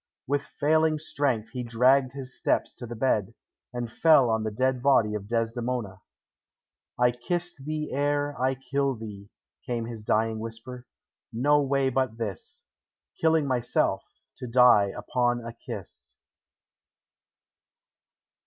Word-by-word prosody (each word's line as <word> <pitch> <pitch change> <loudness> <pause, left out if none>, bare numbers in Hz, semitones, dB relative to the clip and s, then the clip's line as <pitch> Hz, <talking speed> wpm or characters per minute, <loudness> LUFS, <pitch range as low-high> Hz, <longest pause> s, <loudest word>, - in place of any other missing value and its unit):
With 145 +1 0
failing 155 +2 +1
strength 135 -7 -1
he 125 - -4
dragged 125 +3 +3
his 135 -2 -6
steps - - 0
to 120 - -7
the 120 - -6
bed, 110 -5 0 0.4
and 120 -1 -4
fell 150 -7 +5
on 110 0 +1
the 110 - -2
dead 130 +3 0
body 120 -6 +3
of 105 -1 -5
Desdemona. 115 -3 -2 1.0
"I 125 0 +4
kissed 170 +4 -3
thee 155 0 -3
ere 145 +1 0
I 130 +1 +2
killed 135 -1 -1
thee," 100 -2 -9 0.3
came 120 -2 -3
his 115 -2 -7
dying 110 +1 +1
whisper. 115 +3 -8 0.4
"No 145 +6 +3
way 135 -1 +1
but 130 -3 -1
this: 105 -7 -6 0.5
killing 160 -2 +3
myself, 125 -3 0 0.3
to 125 - -6
die 120 -4 +5
upon 120 -1 0
a 115 - -6
kiss." 115 - -9
125 Hz, 130 wpm, -27 LUFS, 115-140 Hz, 1.0 s, fell